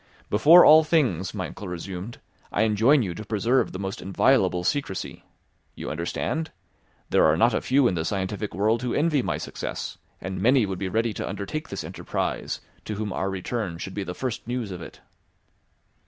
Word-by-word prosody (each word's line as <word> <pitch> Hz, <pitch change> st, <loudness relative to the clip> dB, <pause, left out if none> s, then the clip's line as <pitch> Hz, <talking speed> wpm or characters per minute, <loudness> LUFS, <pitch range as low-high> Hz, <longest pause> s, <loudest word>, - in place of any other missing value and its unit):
"Before 155 Hz, +12 st, +8 dB
all 155 Hz, +1 st, +8 dB
things," 125 Hz, -, +1 dB
my 95 Hz, -3 st, -2 dB
uncle 105 Hz, -, -8 dB
resumed, 90 Hz, +5 st, -6 dB, 0.3 s
"I -, -, +2 dB
enjoin 115 Hz, +6 st, +4 dB
you 90 Hz, -4 st, -3 dB
to 110 Hz, -, -7 dB
preserve 115 Hz, +5 st, +1 dB
the -, -, -6 dB
most 95 Hz, 0 st, -5 dB
inviolable 95 Hz, -3 st, +2 dB
secrecy: 140 Hz, -4 st, -2 dB, 0.5 s
you -, -, -5 dB
understand? 85 Hz, -, -2 dB, 0.6 s
There -, -, +4 dB
are 80 Hz, 0 st, +4 dB
not 115 Hz, +6 st, +4 dB
a -, -, 0 dB
few 135 Hz, 0 st, +3 dB
in -, -, +1 dB
the 80 Hz, -2 st, -1 dB
scientific 100 Hz, +2 st, -3 dB
world 110 Hz, +4 st, +2 dB
who 125 Hz, -1 st, -2 dB
envy 150 Hz, -2 st, +2 dB
my -, -, -2 dB
success, -, -, -5 dB, 0.2 s
and 95 Hz, 0 st, -5 dB
many 125 Hz, +2 st, +4 dB
would 95 Hz, -2 st, -4 dB
be 95 Hz, -, -2 dB
ready 115 Hz, +3 st, 0 dB
to -, -, -4 dB
undertake 100 Hz, +11 st, -5 dB
this -, -, -5 dB
enterprise, -, -, -3 dB, 0.2 s
to 105 Hz, -, -4 dB
whom 105 Hz, -1 st, -3 dB
our 95 Hz, -, -1 dB
return 95 Hz, -1 st, -3 dB
should 95 Hz, +2 st, -6 dB
be 100 Hz, -, -3 dB
the 90 Hz, -1 st, -6 dB
first 125 Hz, -4 st, -4 dB
news 120 Hz, -4 st, -3 dB
of 90 Hz, -2 st, -6 dB
it." -, -, -11 dB
105 Hz, 185 wpm, -25 LUFS, 95-125 Hz, 0.6 s, Before